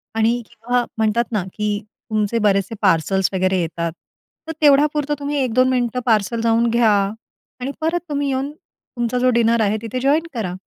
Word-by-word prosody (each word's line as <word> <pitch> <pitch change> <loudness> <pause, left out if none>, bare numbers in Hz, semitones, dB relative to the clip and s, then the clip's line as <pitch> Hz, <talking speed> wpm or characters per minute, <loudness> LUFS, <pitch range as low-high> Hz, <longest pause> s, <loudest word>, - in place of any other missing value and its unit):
आणि 230 +2 +2
किंवा 245 +2 -1
म्हणतात 225 +2 +1
ना, 210 -5 0
की 210 -1 -1
तुमचे 215 +1 -2
बरेचसे 195 +1 +1
पार्सल्स 190 0 +2
वगैरे 185 0 +1
येतात, 170 0 -3 0.6
तर - - -3
तेवढ्यापुरतं 295 0 +3
तुम्ही 285 0 -2
1-2 255 +1 +2
मिनिटं 250 -1 0
पार्सल 225 0 +1
जाऊन 230 +1 +2
घ्या 230 -1 +3 0.7
आणि 255 +2 -3
परत 330 +2 +1
तुम्ही 285 -1 -1
येऊन 270 +2 -2
तुमचा 240 -5 -6
जो 255 +1 +3
डिनर 230 -1 +3
आहे 210 0 +1
तिथे 230 +2 -4
जॉइन 295 +5 +2
करा. 210 -7 -3
235 Hz, 165 wpm, -20 LUFS, 210-260 Hz, 0.7 s, तेवढ्यापुरतं